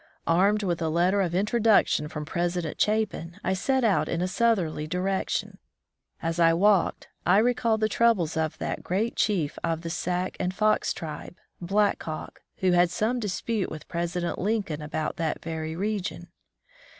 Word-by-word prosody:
Armed 200 +5 +3
with 175 -3 -1
a 160 - 0
letter 180 +5 +2
of 175 -2 -1
introduction 210 -5 +3
from 150 0 -6
President 175 0 -2
Chapin, 205 -5 0
I 190 - +1
set 260 +7 +1
out 220 -4 +2
in 170 - -1
a 180 - 0
southerly 185 -8 +1
direction. 185 +3 -2 0.6
As 165 +1 -1
I 165 -1 +5
walked, 195 +1 +2
I 180 +2 +4
recalled 230 -1 +2
the 215 - +3
troubles 215 -7 +2
of 160 0 -1
that - - -3
great 210 +6 -1
chief 175 -9 0
of 165 -1 -1
the 165 -1 -5
Sac 180 +1 -2
and 185 0 -1
Fox 215 +2 +2
tribe. 155 +2 -6 0.3
Black 200 +3 +1
Hawk, 155 -1 -7 0.2
who 185 -1 +3
had 175 0 +4
some 225 +7 0
dispute 210 0 -2
with 155 -1 -8
President 175 +1 -2
Lincoln 200 -7 -1
about 150 +1 -3
that 165 -1 -1
very 160 -1 -4
region. 195 -2 -3
180 Hz, 160 wpm, -26 LUFS, 165-210 Hz, 0.6 s, I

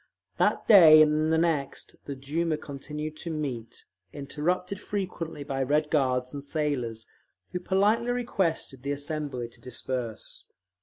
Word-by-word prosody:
That - - +2
day 165 -7 +9
and 155 +1 +2
the 160 - +3
next 160 -5 -1
the 140 - -5
Duma 155 +4 -1
continued 150 +2 -6
to 170 - -5
meet, 130 -8 -5 0.3
interrupted 180 +7 -2
frequently 180 -7 -4
by 135 -1 -3
Red 150 +3 +1
Guards 130 -3 +1
and 140 -1 -6
sailors, 140 -7 -2 0.5
who 180 - -2
politely 205 +6 +2
requested 190 - -1
the 140 +2 -2
assembly 145 -4 -3
to - - -18
disperse. 125 -3 -5
150 Hz, 135 wpm, -27 LUFS, 135-165 Hz, 0.5 s, day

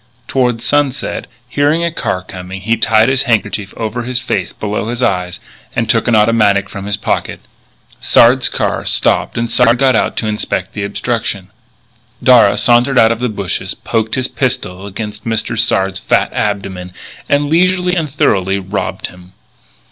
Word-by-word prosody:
Toward 125 -3 0
sunset, 145 0 0 0.2
hearing 145 +5 +1
a 170 - 0
car 95 - -2
coming, 95 +1 -8
he 115 +4 +1
tied 110 0 +3
his 130 0 +2
handkerchief 105 -3 0
over 115 +2 -3
his 125 +1 -3
face 95 -7 -2
below 105 +2 -3
the 120 +1 0
eyes, 90 -2 -3 0.4
and 115 - 0
took 115 +2 +1
an 120 - +3
automatic 105 -2 +3
from 100 0 -7
his 105 - -1
pocket. - - -2 0.6
Sard's 125 +2 +5
car - - -2
stopped - - +1
and 115 0 0
Sard 120 +1 +3
got 130 -1 +3
out - - 0
to - - -1
inspect 105 -3 -3
the 105 - -4
obstruction. 100 -2 -3 0.7
Darragh 120 -6 +6
sauntered 120 +3 +3
out 110 -1 +6
of 115 - -2
the 125 0 -1
bushes, 100 -4 -3
poked 110 -1 -2
his 130 -1 -1
pistol 120 -9 -3
against 105 +1 -6
Mr. 115 0 -2
Sard's 95 -3 +1
fat - - +1
abdomen, 95 -3 -3 0.4
and 145 0 +2
leisurely 180 +3 +2
and 160 -4 -1
thoroughly 95 -8 +1
robbed 100 +1 -4
him. 90 +1 -12
110 Hz, 165 wpm, -15 LUFS, 100-125 Hz, 0.7 s, Darragh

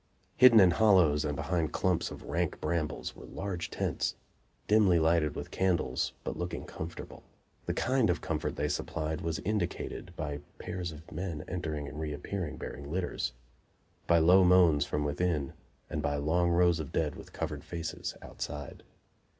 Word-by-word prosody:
Hidden 125 -3 +8
in 95 -3 +7
hollows 90 -7 +5
and 75 -1 -1
behind 85 0 -1
clumps 90 -2 +1
of - - -9
rank - - -1
brambles 80 -3 -2
were - - -11
large 95 -3 -4
tents, - - -1 0.5
dimly 105 -5 +5
lighted 80 -2 +2
with - - -6
candles, 85 -9 0
but - - -3
looking 90 0 -4
comfortable. 80 +1 -7 0.5
The - - -1
kind 130 -4 +2
of 90 - +1
comfort 75 -2 -2
they 75 - 0
supplied 75 +1 -2
was 80 -1 -1
indicated 90 -3 -3
by 75 -3 -3 0.2
pairs 90 -2 -4
of 80 +1 -12
men 85 -2 -4
entering 80 -5 -3
and 75 +2 -7
reappearing, 80 +3 -4
bearing 70 +1 -7
litters; 85 -8 -2 0.7
by 85 - +5
low 90 +4 +6
moans 90 -5 +5
from 75 - -1
within 75 -1 -1 0.3
and 75 - -3
by 75 -1 0
long 80 +5 +2
rows 85 -1 +4
of 75 - -5
dead 75 -2 0
with - - -11
covered 75 -3 -4
faces 85 -1 -5
outside. 75 -1 -6
85 Hz, 160 wpm, -31 LUFS, 75-90 Hz, 0.7 s, Hidden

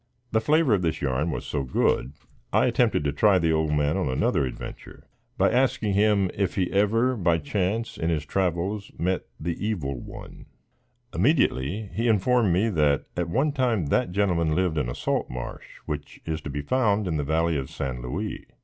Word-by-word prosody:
The 110 - +2
flavor 150 -1 +3
of 100 - +2
this 80 -2 -1
yarn 70 +4 0
was - - -4
so 70 - -2
good, 65 0 0 0.4
I - - +4
attempted - - +2
to 75 - 0
try 95 +7 +4
the 80 -2 +2
old 80 -1 +1
man 75 +3 +1
on 90 -8 0
another 65 +1 +1
adventure, 65 - -9 0.3
by - - +3
asking 120 -5 +1
him 100 -2 +3
if 100 -2 -1
he 95 -3 0
ever, 115 +6 +2
by 85 -6 +2
chance, 100 +8 -2
in 80 - 0
his 75 -3 -1
travels, 95 +4 -1
met 90 +2 -1
the 85 +3 -3
Evil 75 - -2
One. - - -11 0.7
Immediately, 100 - +1
he 115 +2 0
informed 115 0 +3
me 95 +6 +2
that 75 -7 +2
at 85 -1 -2
one 135 - +1
time, 125 - +1
that 90 - +1
gentleman 90 -5 +1
lived 90 -4 +1
in - - -1
a - - -4
salt - - -1
marsh, 60 -1 -6 0.2
which 75 -1 -6
is 80 -1 -3
to - - -6
be 70 +1 -3
found 105 - +1
in 80 -3 -1
the 75 - -1
valley 80 +3 +1
of 65 -2 -3
San 65 -3 -4
Louis. 85 - -4
90 Hz, 190 wpm, -25 LUFS, 75-105 Hz, 0.7 s, I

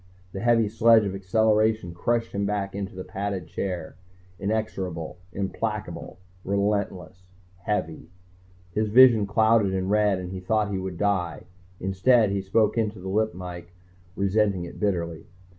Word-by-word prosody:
The 95 - -6
heavy 115 0 +3
sledge 115 0 +5
of 95 - -2
acceleration 110 0 +1
crushed 115 +6 -1
him 100 - -2
back 100 -1 -2
into 100 -1 -5
the 95 - -6
padded 100 -1 -4
chair, 90 -4 -5 0.4
inexorable, 95 -6 -3
implacable, 95 -2 -4 0.3
relentless, 100 -2 -2 0.4
heavy. 80 -7 -2 0.6
His 105 +3 0
vision 115 -2 +7
clouded 110 -2 +3
in 95 0 -1
red 105 -2 +3
and 90 0 -6
he 95 - -5
thought 105 +2 0
he 95 - -1
would 95 -2 -5
die. 90 -6 -1 0.4
Instead, 100 +4 +3
he 100 0 -1
spoke 110 +3 +1
into 105 -1 -1
the 95 +1 -7
lip 110 +1 0
mike, 90 -1 -8 0.4
resenting 100 -2 +1
it 85 - -10
bitterly. 85 -5 -2
100 Hz, 140 wpm, -25 LUFS, 95-110 Hz, 0.6 s, vision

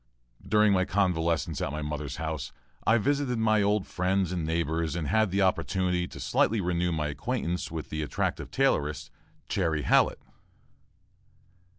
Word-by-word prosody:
During 105 -1 +4
my 95 -1 +3
convalescence 85 -5 0
at - - -1
my 75 +1 -4
mother's 75 -1 -4
house, 80 -4 -4 0.4
I 115 - +6
visited 140 +1 0
my 110 -1 +3
old 105 0 +1
friends 90 0 0
and 90 -3 -2
neighbors 80 0 -1
and 80 -4 -2
had 110 -2 +3
the 95 +2 +1
opportunity 90 -1 0
to - - -10
slightly 110 +2 +1
renew 90 -1 0
my 75 -2 -1
acquaintance 90 - -2
with 80 -1 -6
the 80 - -2
attractive 75 - -2
tailoress, 75 - 0 0.4
"Chairy" 80 -6 0
Hallett. - - +3
90 Hz, 150 wpm, -28 LUFS, 80-100 Hz, 0.4 s, I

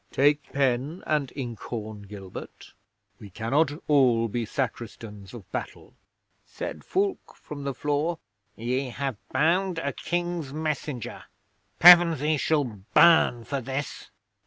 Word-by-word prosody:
Take 145 +1 +2
pen 135 +5 0
and 150 -4 0
ink 120 -5 -5
horn, 110 -3 -6
Gilbert. 100 -2 -10 0.5
We 105 - -11
cannot 130 - +1 0.2
all 125 -6 +4
be 115 +1 -2
Sacristans 110 -6 -5
of 115 -6 -10
Battle." - - -6 0.5
'Said - - -7
Fulke 390 +1 -2
from 145 -2 -9
the 140 - -2
floor, 150 +3 -1 0.4
"Ye 125 +4 -2
have 135 -1 -3
bound 180 +3 +2
a 140 -4 -2
King's 175 -4 -3
messenger. 150 -5 -4 0.5
Pevensey 165 -4 +7
shall 150 +1 +2
burn 120 - +4
for 140 +3 -3
this." 135 +3 -5
140 Hz, 120 wpm, -26 LUFS, 115-155 Hz, 0.5 s, Pevensey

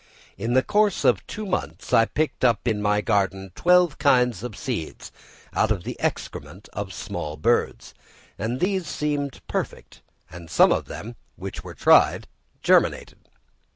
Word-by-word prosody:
In 115 +4 -2
the 130 - +4
course 210 -2 +1
of 110 -6 +2
two 215 - -6
months, 185 -2 -4
I 115 - +6
picked 155 +4 -2
up 120 -2 +2
in 110 -3 0
my 105 0 +2
garden 95 -1 0
twelve 180 - +3
kinds 125 - +3
of 120 -3 -7
seeds, 110 -12 -5 0.4
out 110 - +2
of 100 -5 -1
the - - -5
excrement 85 +8 -4
of 100 -2 -5
small 75 -3 -5
birds, 75 - 0 0.4
and 115 +6 -3
these 185 -1 0
seemed 145 -2 -3
perfect, - - -5 0.3
and 85 0 -10
some - - +5
of - - 0
them, 115 +2 -8 0.2
which - - -7
were - - -9
tried, - - +4 0.4
germinated. - - +2
115 Hz, 155 wpm, -24 LUFS, 100-145 Hz, 0.4 s, I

